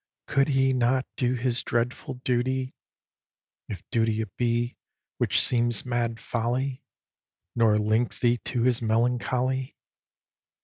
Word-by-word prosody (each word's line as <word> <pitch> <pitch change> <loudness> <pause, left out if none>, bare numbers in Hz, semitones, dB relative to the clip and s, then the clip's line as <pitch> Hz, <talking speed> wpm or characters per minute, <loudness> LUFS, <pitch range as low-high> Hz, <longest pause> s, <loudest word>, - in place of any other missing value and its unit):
Could 135 0 +2
he 135 -2 +2
not 130 +1 +2
do 125 0 +1
his 120 -1 0
dreadful 120 +2 -2
duty, 130 +1 0 1.0
(If 100 - -6
duty 115 -1 +1
it 105 -5 -7
be, 120 0 0 0.4
which - - +2
seems 120 -2 +2
mad 120 -2 -1
folly) 125 +3 -2 0.7
Nor 115 -3 +4
link 110 +3 +1
thee 120 -1 +2
to 120 -3 -1
his 125 -1 +3
melancholy? 125 +3 0
120 Hz, 120 wpm, -26 LUFS, 115-130 Hz, 1.0 s, Nor